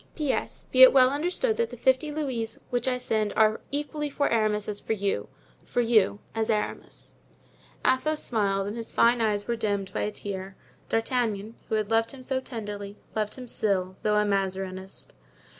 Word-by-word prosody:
"P.S.—Be 270 -3 0
it 260 - +11
well 260 -1 +6
understood 360 - 0
that 470 -1 +1
the - - -9
fifty 260 +5 +2
louis 260 -7 -3
which 245 0 0
I 250 -1 +2
send 215 -4 -1
are 215 0 +3
equally 295 +1 -3
for 285 0 0
Aramis 215 -2 +1
as 205 -1 -1
for - - -2
you—for 200 +3 -4
you 225 -4 +3 0.2
as 225 0 -1
Aramis." 215 -2 -3 0.7
Athos 305 +4 +2
smiled, 195 -4 +1
and 205 +3 -4
his 230 -1 -5
fine 235 0 +4
eye 215 -2 +3
was 205 0 -2
dimmed 205 -5 -2
by - - -1
a 210 - -1
tear. 195 -2 -6 0.3
D'Artagnan, 225 -2 0 0.2
who - - +1
had 215 0 -1
loved 225 0 +3
him 265 -1 -10
so 260 0 -1
tenderly, 205 -5 -6 0.2
loved 215 -1 -1
him 255 -1 -9
still, 190 -5 -1
although 210 0 +2
a 210 - +3
Mazarinist. 190 -1 -3
225 Hz, 175 wpm, -27 LUFS, 205-255 Hz, 0.7 s, it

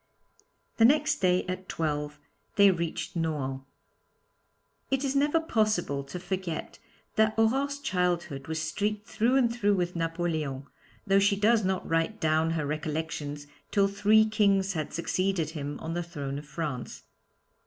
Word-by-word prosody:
The 225 - +6
next 300 +4 +4
day 180 -1 +2
at 185 +1 -5
twelve 150 -2 -2 0.4
they 200 -2 +7
reached 170 -1 -3
Nohant. 145 -5 -2 1.3
It 270 +1 0
is 275 0 -1
never 290 +3 +3
possible 215 - 0
to 180 +6 -6
forget 185 -3 -4 0.4
that 220 0 +3
Aurore's 270 +6 +2
childhood 175 - -1
was 160 0 -2
streaked 205 +6 -2
through 230 +5 +1
and 240 -3 +3
through 205 -3 +2
with 180 -1 -1
Napoleon, 165 -5 -2 0.4
though 195 0 +4
she 200 0 +3
does 215 +2 +3
not 190 0 -1
write 165 +6 0
down 160 +1 +2
her 150 - -1
recollections 150 -1 -3 0.2
till 200 -1 +3
three 210 +2 +4
kings 200 -3 +2
had 155 -3 -3
succeeded 175 -1 -1
him 145 -2 -5
on 160 +1 -4
the 175 - -1
throne 145 -5 -5
of 145 - -12
France. 145 -6 -5
180 Hz, 145 wpm, -28 LUFS, 155-215 Hz, 1.3 s, they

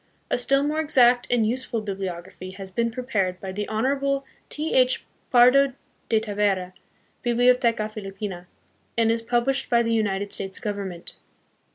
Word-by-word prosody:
A - - +2
still 275 +3 +2
more 300 +2 0
exact 250 -5 +4
and 235 -3 +2
useful 245 0 -2
bibliography 190 -3 -6
has 190 0 -9
been 230 +4 0
prepared 215 -7 -2
by 190 - -6
the 205 +2 -4
Honorable 275 +5 0 0.2
T. 305 +2 -3
H. 255 0 +3 0.2
Pardo 260 +2 +6 0.4
de 220 - +4
Tavera, 200 -4 -1 0.5
Biblioteca 240 -2 +3
Filipino,, 195 -3 -7 0.5
and 225 -1 +3
is 230 0 0
published 245 +4 0
by 235 -1 +4
the 230 0 0
United 205 -2 0
States 195 0 -4
Government. 200 -6 -5
225 Hz, 145 wpm, -24 LUFS, 195-250 Hz, 0.5 s, Pardo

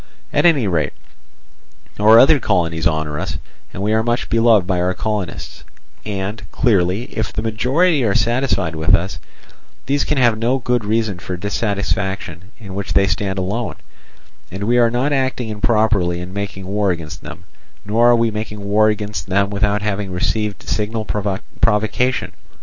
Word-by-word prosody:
At - - +4
any 145 -9 +3
rate 85 -7 0 1.1
our 110 +2 +7
other 140 +5 +7
colonies 85 -7 +1
honour 80 -2 -2
us, - - -3 0.3
and 95 - -5
we 105 +1 +1
are 110 - +3
much 120 +2 -1
beloved 115 -4 +4
by 90 -1 0
our 90 +1 0
colonists; 105 -4 -4 0.4
and 100 +1 -4
clearly, 100 -4 +1
if 110 - -2
the 110 - -3
majority 130 +8 +2
are 105 -4 +1
satisfied 120 -9 +1
with 80 +5 +4
us, 95 +2 -3 0.7
these 140 +2 +1
can 150 - -1
have 120 -4 +3
no 120 +4 +1
good 120 -2 0
reason 105 -3 -1
for 90 0 -5
a - - -10
dissatisfaction 100 -3 -2
in 100 -4 -10
which 100 0 -4
they 100 - +4
stand 95 +2 -1
alone, 100 +6 -2 0.7
and 95 +3 -6
we 120 +3 +2
are 120 -1 +5
not 125 +5 0
acting 130 -3 -1
improperly 105 -4 +1
in 90 +1 -7
making 100 -1 -5
war 100 +1 0
against 85 -4 -4
them, - - -10 0.4
nor 115 +4 +3
are 120 - +6
we 115 -1 +1
making 105 -1 -5
war 110 +1 +4
against 105 -1 -3
them 100 +1 +1
without 105 0 0
having 100 -2 -2
received 100 +2 -2
signal 110 +1 -2
provocation. 105 +4 -1
105 Hz, 165 wpm, -19 LUFS, 95-115 Hz, 1.1 s, our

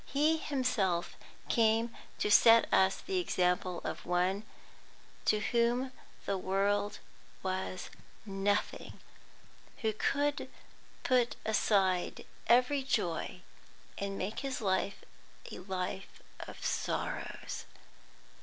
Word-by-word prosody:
He 305 +3 +3
Himself 250 - 0 0.3
came 225 0 +2 0.2
to 210 - 0
set 230 +2 +8
us 190 0 +5
the 380 -1 -1
example 180 - 0
of - - -4
one 185 +4 0 0.8
to 215 - +3
whom 240 +3 +1 0.3
the 195 -1 -1
world 200 +2 +1 0.5
was 185 0 -3 0.3
nothing, 200 0 -1 0.8
who 220 -1 +2
could 290 +6 0 0.5
put 250 -2 +2
aside 195 -4 +1 0.2
every 250 +4 +4
joy, 180 -8 -1 0.5
and 200 0 -3
make 200 +4 -3
His 270 -2 -3
life 195 -2 0 0.5
a - - -7
life 190 +1 -4 0.2
of - - -8
sorrows. - - -3
205 Hz, 100 wpm, -32 LUFS, 190-245 Hz, 0.8 s, set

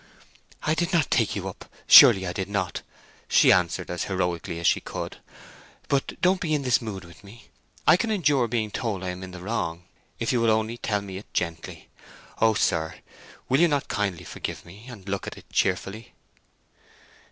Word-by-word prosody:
"I 155 - +1
did 170 +3 -1
not 165 -4 +2
take - - +2
you - - -4
up—surely 95 -1 +6
I 90 - -3
did 95 +1 -4
not!" 100 -3 -2 0.5
she - - +5
answered 90 -1 +1
as 90 - -3
heroically 90 -3 -2
as 85 - -5
she - - +4
could. - - -6 0.7
"But 140 -1 -1
don't 185 0 +3
be 155 -3 0
in 145 - -2
this 125 -2 +2
mood 100 -5 -6
with 85 +3 -16
me. 105 +4 -15 0.4
I - - +6
can 230 +4 -2
endure 145 - +2
being 110 -2 -2
told 100 -5 -3
I 90 - -3
am 90 +1 -6
in 95 - -7
the 90 -1 -10
wrong, 90 -5 -3 0.3
if 115 - -1
you 120 - +1
will 115 - +3
only 110 +1 0
tell 105 -2 -1
it - - -10
me 95 0 -7
gently! 85 -2 -4 0.5
O 110 -1 +4
sir, 80 -5 0 0.5
will 130 - +2
you 175 - +6
not 145 -3 -1
kindly 100 -6 -2
forgive - - -6
me, 100 +8 -14
and 105 -6 -12
look 100 0 -3
at - - -7
it - - -15
cheerfully?" 100 +4 -1
105 Hz, 190 wpm, -25 LUFS, 90-125 Hz, 0.7 s, up—surely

